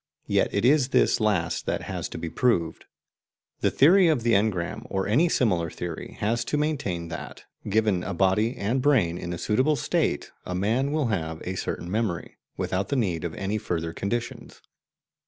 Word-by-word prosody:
Yet - - +1
it 100 +3 0
is 140 0 +4
this - - +3
last 100 -6 0
that - - -1
has - - -4
to - - -7
be 85 - -4
proved. 85 -5 0 0.7
The - - +2
theory 180 +6 +5
of 150 -8 +2
the 120 - +2
engram, 105 +2 0
or 95 0 -1
any 145 +12 +3
similar 90 - +1
theory, 85 0 -6
has 115 +3 +1
to 150 - -1
maintain 135 - -2
that, 80 - -7 0.3
given 105 -3 +2
a - - -4
body 100 +6 +2
and 115 +6 0
brain 105 -12 +2
in 85 - -5
a 85 - -3
suitable 130 - +2
state, - - -1
a 90 - -4
man 115 +9 +1
will 150 -5 0
have 80 -6 -2
a 95 - -3
certain 90 -1 -4
memory, 105 -5 -2 0.2
without 95 +2 -1
the 140 - 0
need 90 - 0
of 85 -2 -4
any 100 +2 -2
further 85 -4 -3
conditions. 115 +4 -4
105 Hz, 180 wpm, -26 LUFS, 90-125 Hz, 0.7 s, theory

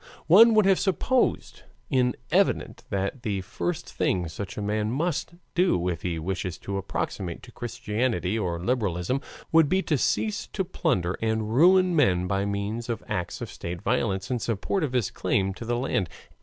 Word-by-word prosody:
One 220 +7 +8
would 215 -2 +5
have 195 -1 +4
supposed 240 - 0 0.3
it 125 -2 +2
evident - - +1
that 100 +6 -2
the 105 -6 -2
first 175 - -3
thing 90 -2 0
such 95 +4 -6
a - - -2
man 105 +1 0
must 165 +6 -2 0.2
do, 170 - +2
if 85 -3 -3
he 85 -2 -2
wishes 90 +2 -3
to 100 0 -4
approximate 95 -2 -4
to 120 - -12
Christianity 110 -4 -2
or 85 -4 -2
liberalism, 105 +2 0 0.3
would 160 -3 +5
be 190 +1 +2
to 150 -4 0
cease 215 - 0
to 190 - 0
plunder 90 - -1
and 110 -1 -1
ruin 180 +5 +5
men 90 - +3
by 95 +1 0
means 100 +4 -3
of 115 -2 -3
acts 100 -5 -3
of - - -5
state 85 +2 -6
violence 110 -2 0
in 125 - 0
support 115 - -1
of 135 -4 -2
his 125 -5 +1
claim 95 0 0
to 115 - -8
the 120 +1 0
land. 105 - -1
110 Hz, 175 wpm, -26 LUFS, 95-145 Hz, 0.3 s, One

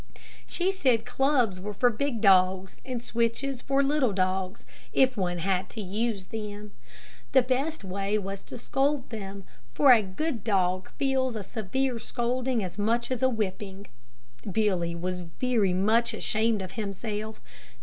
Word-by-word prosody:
She 365 +2 0
said 255 - +2
clubs 245 -6 +2
were 205 +2 -6
for 245 +4 +4
big 235 0 -2
dogs 190 -2 +4
and 250 -3 -4
switches 240 +3 -1
for 275 +1 +2
little 275 -5 +2
dogs, 185 0 -1 0.3
if 260 -1 +4
one 180 -4 -1
had 185 +1 0
to 225 - -6
use 205 +1 -2
them. 210 -1 -6 0.6
The 260 - +6
best 270 +3 -1
way 195 +2 -1
was 195 -1 -4
to - - -8
scold 270 +2 0
them, 200 -3 -6 0.3
for 280 - +7
a 230 - +5
good 215 +5 -3
dog 185 -4 +1
feels 265 -3 +1
a 210 - -3
severe 235 +5 -2
scolding 245 0 -1
as 185 +2 -6
much 235 +4 +1
as 255 - -1
a 260 - +4
whipping. 200 -3 -3 0.7
Billy 180 -5 +1
was 180 +2 -3
very 200 +4 0
much 220 +5 +2
ashamed 220 -1 +1
of 185 - -7
himself. 215 0 -4
220 Hz, 150 wpm, -28 LUFS, 195-250 Hz, 0.7 s, for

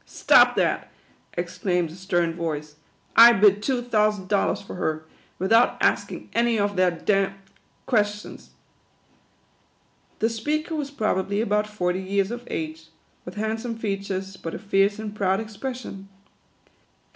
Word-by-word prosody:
" - - -39
Stop - - +5
that - - 0 0.2
!" - - -29
exclaimed 180 -5 -1
a - - -10
stern 175 -2 -1
voice. 155 -3 -4 0.2
" - - -37
I - - +5
bid 205 -1 +4
two 250 +1 -1
thousand 210 -5 +1
dollars 200 -2 +1
for 200 - -10
her, 155 -3 -2 0.3
without 225 +6 +3
asking - - -1
any 235 0 +2
of 205 -1 0
their 185 0 +4
d 175 +4 -1
ŌĆö 195 0 +2
d 195 - -16 0.5
ques 210 -3 +1
tions." - - -12 1.7
The 225 - +1
speaker 300 +9 -2
was 290 -2 -3
probably 205 -6 -1
about 210 -1 +1
forty 185 -3 -2
years 195 +2 0
of 240 0 -7
age, 160 0 -5 0.4
with 180 - -8
handsome 225 +2 -3
features, 195 -3 -4
but 165 - -6
a - - -4
fierce 200 +1 +1
and 215 -1 -6
proud 195 -1 +1
expression. 220 -2 -7
200 Hz, 155 wpm, -24 LUFS, 185-220 Hz, 1.7 s, Stop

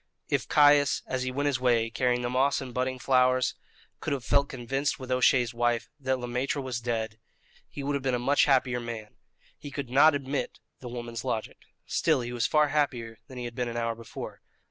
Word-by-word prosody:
If - - 0
Caius, 145 -1 +5
as 130 -1 -2
he 130 0 -2
went 140 +3 -2
his 140 -4 +1
way 115 -3 +2
carrying 125 0 +1
the 120 - -1
moss 135 +3 +2
and 130 -2 -7
budding 130 +1 -1
flowers, 130 0 +3 0.5
could 155 - -2
have 130 -4 -4
felt 140 +5 +2
convinced 135 +3 -2
with 130 -1 -7
O'Shea's 125 -1 +3
wife 120 -1 0
that 130 -1 0
Le 125 - -5
Maître 125 +4 -1
was 130 -3 -4
dead, 110 -2 -3 0.5
he 140 - -7
would 145 +1 -1
have 140 - -1
been 130 -1 0
a - - +1
much 135 +4 +3
happier 130 -3 +2
man. 115 -3 -7 0.4
He 145 - -8
could 135 -3 -5
not 145 +3 +6
admit 140 0 -3 0.2
the 125 - -8
woman's 120 -2 -6
logic. 110 - -3 0.3
Still, - - +1
he 120 0 -5
was 120 - +1
far 150 -1 +3
happier 125 -7 -1
than 130 -3 -11
he 125 - -4
had 120 - -6
been 125 0 -2
an 120 - -5
hour 115 0 0
before. 115 0 -8
125 Hz, 210 wpm, -28 LUFS, 120-135 Hz, 0.5 s, not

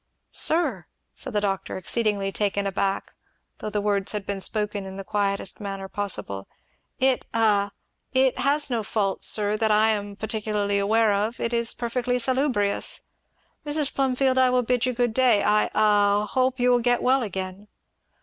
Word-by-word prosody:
"Sir!" 295 - +1 0.3
said - - -7
the 210 - +1
doctor, 195 -2 -2
exceedingly 200 0 0
taken 200 0 -1
aback, 195 0 -2 0.5
though - - -4
the 210 0 -2
words 200 -1 +1
had 205 -2 -4
been 200 -1 -4
spoken 210 -1 -2
in 190 0 -8
the 195 - -6
quietest 200 -1 -1
manner 195 -1 -5
possible, 190 - -3 0.5
'it 260 -1 +2
a 210 -3 +2 0.4
it 260 -1 +2
has 285 +2 +2
no 235 -2 0
fault, 200 -2 -2
sir, 210 -1 +2
that 220 0 +2
I 215 +1 +4
am 205 -2 -2
particularly 210 -1 -1
aware 215 +1 +2
of 210 +4 -1
it 235 - -2
is 235 0 +2
perfectly 245 +1 -1
salubrious. 250 -5 +1 0.6
Mrs. 295 -1 +1
Plumfield, 260 -1 +1
I 255 -1 +5
will 250 0 +2
bid 245 +1 +1
you 255 - 0
good 240 -1 0
day; 240 -5 +3
I 210 +1 +3
a - - -6 0.5
I - - -5
hope 255 +3 0
you 250 0 +3
will 245 - +4
get 245 0 +1
well 260 +1 +3
again!" 190 -1 -5
215 Hz, 170 wpm, -24 LUFS, 200-250 Hz, 0.6 s, I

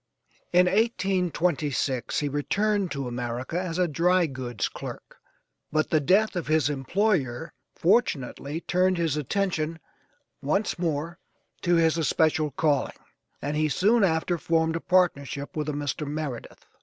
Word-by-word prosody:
In 180 +1 +5
1826 180 - 0
he 145 - 0
returned 200 +7 0
to 140 -4 -4
America 125 +6 -3
as 175 -2 -4
a 180 -1 +2
dry 175 +3 +3
goods 130 -7 -3
clerk, - - -9 0.5
but 155 0 0
the 155 - +4
death 195 +9 +3
of 175 - -3
his 155 -1 +2
employer 155 - 0 0.2
fortunately 160 - 0
turned 185 +1 +1
his 165 -4 0
attention 165 +1 -1 0.6
once 185 +7 0
more 165 0 -2 0.4
to 175 -1 +2
his 165 0 +3
especial 155 0 +2
calling, 145 -2 0 0.5
and 145 +2 -2
he 155 0 +1
soon 210 - +3
after 170 -1 +1
formed 160 0 +1
a 165 - -2
partnership 145 -6 0
with 155 -1 -2
a - - -2
Mr. 145 +1 -3
Meredith. 145 -5 -5
160 Hz, 135 wpm, -26 LUFS, 145-180 Hz, 0.6 s, In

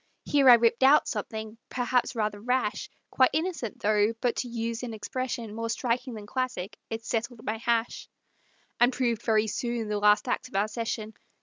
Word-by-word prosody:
Here 280 -3 +5
I 245 - +11
ripped 235 +1 +2
out 275 +3 +6
something, 220 +1 -5
perhaps 250 0 0
rather 210 -2 -2
rash, 250 -2 -1 0.2
Quite 260 -1 +4
innocent, 320 - -2
though; 210 +1 +3
but 245 -1 0
to 250 - -2
use 230 -1 -3
an 235 -3 -5
expression 235 0 -4
More 230 +1 -3
striking 245 +1 -1
than 210 -1 -8
classic, 220 -4 -3
it 225 0 -5
"settled 235 0 -3
my 215 +1 -1
hash," 235 0 -1 0.7
And 245 +1 +5
proved 240 -3 0
very 220 -2 +2
soon 230 0 -3
the 210 -1 -1
last 210 +3 +4
act 250 - -1
of 255 - -14
our 205 +2 +1
session. 220 0 -4
230 Hz, 180 wpm, -27 LUFS, 215-250 Hz, 0.7 s, I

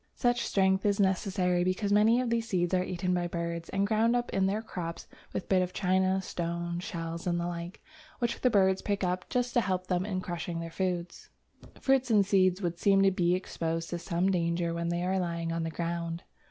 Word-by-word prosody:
Such 245 -1 +1
strength 190 -1 +2
is 205 -1 +1
necessary 190 -2 +1
because 185 +3 0
many 220 +3 +5
of 245 -2 -2
these 230 -1 0
seeds 175 -3 0
are 185 0 +3
eaten 180 0 -2
by 175 -1 0
birds 170 -1 -4
and 195 +1 +1
ground 225 +3 +2
up 240 0 -1
in 190 0 +2
their 210 +3 -1
crops 170 -6 -6 0.2
with - - -4
bits 190 -1 +3
of 180 0 -2
china, 190 0 +1
stones, 170 0 -3
shells, 165 0 -5
and 175 -1 +1
the 170 - -2
like, 175 +2 -6 0.3
which 235 -2 -2
the 255 - +4
birds 190 -4 +3
pick 200 -1 -1
up 180 0 -1
just 245 -1 0
to 240 - +4
help 185 -3 -1
them 180 -1 0
in 190 -2 -2
crushing 175 -1 -4
their 165 0 -6
food. 180 -1 -2 0.7
Fruits 265 -2 +2
and 210 -3 +4
seeds 190 -1 +3
would 170 -1 -2
seem 195 -1 +4
to 195 - +5
be 180 -1 +2
exposed 165 -2 -3
to 175 - -2
some 180 +2 0
danger 170 -1 0
when 170 0 -2
they 175 +1 -1
are 190 +1 +1
lying 170 -2 -2
on 165 0 -1
the 165 - -2
ground. 170 0 -3
185 Hz, 215 wpm, -29 LUFS, 170-195 Hz, 0.7 s, many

